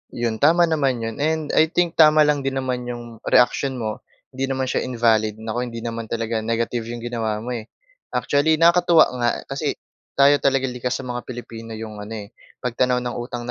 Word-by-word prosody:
'Yon, 115 -2 -2
tama 165 +4 +5
naman 140 -8 +1
'yon. 115 +2 -5
And 155 0 0
I 160 - +4
think 170 +1 -1
tama 155 -1 +7
lang 150 -1 +2
din 135 -1 -2
naman 125 -2 -2
'yong 120 -2 -7
reaksyon 130 +2 +3
mo, 110 -3 -4 0.3
hindi 135 0 -2
naman 135 0 -1
siya 130 - 0
invalid. 115 -3 +2
Naku, 110 +3 -4
hindi 115 -1 -7
naman 115 -1 -4
talaga 115 0 -2
negative 115 +1 -2
'yong 120 0 -6
ginawa 110 -3 -2
mo, 125 - -5
eh. 115 -3 -5 0.5
Actually, 145 +3 +2
nakakatuwa 170 0 +5 0.2
nga 120 0 +2 0.2
kasi 140 +1 -2 0.4
tayo 140 +1 +5
talaga 135 -1 +2
likas 125 -1 -2
sa - - -5
mga 120 -1 -5
Pilipino 115 -2 -8
'yong 110 -1 -7
ano, 105 +2 -7
eh, 100 - -15 0.3
pagtanaw 125 0 +1
ng 120 -1 -4
utang 120 0 -5
125 Hz, 190 wpm, -22 LUFS, 115-140 Hz, 0.5 s, tama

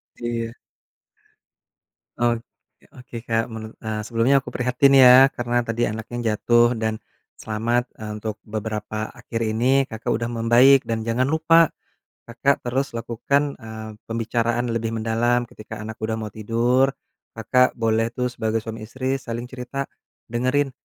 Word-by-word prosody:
Iya. 115 -1 -3 1.6
Oke 120 -1 +1 0.6
oke, 125 -1 -12
Kak. 115 0 +2
Menu 110 -1 -7
eee, 110 -1 -4
sebelumnya 115 +5 +2
aku - - -8
prihatin 125 +2 +2
ya, 130 +1 +9
karena 120 -2 -1
tadi 115 0 -1
anaknya 110 +1 -3
jatuh 120 +2 +3
dan 110 -1 -2 0.4
selamat, 115 +3 -1
eee, 110 -1 -7
untuk 110 0 -5
beberapa 110 0 -4
akhir 120 -1 -5
ini, 130 +4 +3
Kakak 110 -2 -6
udah 115 - -3
membaik 120 +3 +5
dan 110 -1 -2
jangan 125 +3 +1
lupa, 160 +1 +4 0.5
Kakak 125 +4 0
terus 130 +1 -2
lakukan, 140 +5 -1
eee, 110 0 -8 0.2
pembicaraan 115 +1 -1
lebih 115 0 -2
mendalam. 115 +2 +1
Ketika 110 -2 -9
anak 110 0 -7
udah 110 0 -2
mau 110 -1 -5
tidur, 120 +5 +1 0.4
Kakak 125 +3 +2
boleh 115 0 0
tuh 125 -1 -1
sebagai 110 -2 -2
suami 110 -1 -7
istri 130 +3 -2
saling 120 0 -6
cerita, 130 +2 -4 0.5
dengerin, 130 +4 +1
115 Hz, 140 wpm, -23 LUFS, 110-125 Hz, 1.6 s, ya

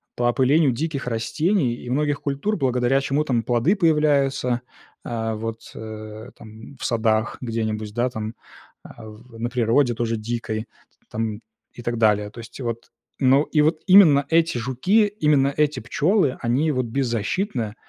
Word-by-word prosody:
по 120 - -3
опылению 130 +4 +3
диких 140 +1 -3
растений 120 - 0
и 120 - -9
многих 145 +2 0
культур, 145 +10 -2
благодаря 125 -1 +1
чему 140 +2 0
там 125 -6 0
плоды 120 - +2
появляются, 140 -7 +2 0.4
а, 115 -2 -3
вот, 115 +1 -5
э, 110 +1 -8
там, 110 +4 -13
в - - -6
садах 110 -2 0
где-нибудь, 110 -3 -3
да, 120 +2 0
там, 110 -1 -6 0.5
а 115 - -12
в 115 +2 -13
на 120 +1 -2
природе 120 +1 +2
тоже 115 -1 -1
дикой, 110 0 -4 0.4
там, 110 -1 -3 0.3
и 120 - -10
так 120 0 -2
далее. 105 -2 +2
То 115 - -12
есть, 115 +3 -11
вот, 115 -2 -5 0.3
ну, 135 +2 +4
и 150 -1 +1
вот 155 +1 +1
именно 165 -8 +7
эти 165 -4 +2
жуки, 180 - +2
именно 150 -8 +2
эти 150 -3 +1
пчёлы, 145 - +1
они 135 +6 +1
вот 130 -2 -1
беззащитны 115 - -2
125 Hz, 155 wpm, -22 LUFS, 115-145 Hz, 0.5 s, именно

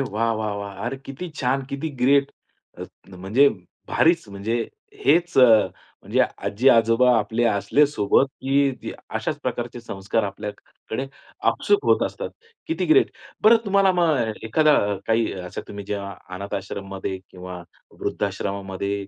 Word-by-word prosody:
वाह, 115 -2 0
वाह, 110 -1 -2
वाह! 100 0 -6
अरे 135 +2 -3
किती 135 +6 -8
छान! 135 -2 -1
किती 140 +3 -3
ग्रेट! 140 +2 +4 0.5
अ, - - -5 0.2
त 95 - -14
म्हणजे 130 +9 +5 0.4
भारीच. 170 +1 +3
म्हणजे 100 +4 -3 0.5
हेच 175 -2 +3
अ, 125 - +9 0.6
म्हणजे - - 0 0.3
आजी-आजोबा 115 +1 +4
आपले 110 +3 0
असले 100 +9 +3
सोबत, 130 -1 +2
की 135 0 0 0.3
अशाच - - -3
प्रकारचे 120 0 -3
संस्कार 100 -1 -2
आपल्याकडे 105 +5 -6 0.4
आपसूक 410 0 +1
होत - - +3
असतात. - - -6 0.4
किती 325 - -1
ग्रेट! 395 - +4 0.3
बरं 225 +2 +8
तुम्हाला 195 -1 +3
मग 155 -11 +2
एखादा 150 +7 +4 0.3
काही 115 0 +1
अशा 90 0 -6
तुम्ही 100 -1 -7
जेव्हा 100 -1 -3 0.2
अनाथ 100 +2 -5
आश्रमामध्ये 95 0 -5
किंवा 90 -1 -8 0.4
वृद्धाश्रमामध्ये 100 0 -3
115 Hz, 130 wpm, -23 LUFS, 100-140 Hz, 0.6 s, अ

